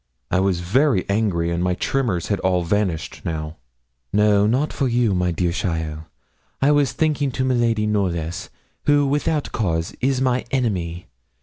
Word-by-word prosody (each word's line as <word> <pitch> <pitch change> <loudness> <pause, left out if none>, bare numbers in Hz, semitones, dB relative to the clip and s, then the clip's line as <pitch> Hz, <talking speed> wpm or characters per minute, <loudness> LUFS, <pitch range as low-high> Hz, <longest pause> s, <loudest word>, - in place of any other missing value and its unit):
I - - +3
was 95 -2 +1
very 115 - +2
angry, 100 -5 0
and 85 +1 -1
my 90 0 +1
tremors 110 -7 -1
had 100 - 0
all 90 -1 +1
vanished 90 -3 -1
now. 80 -1 -4 0.5
'No, 105 0 +4
not 130 +7 +1
for 135 - 0
you, 120 -1 +2 0.2
dear 85 +1 0
cheaile; 80 -3 -3 0.5
I 140 +2 +4
was 145 -4 +3
thinking 150 -3 0
to 130 +2 -1
miladi 115 -4 +1
Knollys, 90 -5 -1 0.4
who, 145 -1 +4
without 145 +2 0
cause, 85 -7 -1
is 130 0 +1
my 130 -1 +1
enemy. 90 -9 -1
105 Hz, 150 wpm, -22 LUFS, 85-130 Hz, 0.5 s, No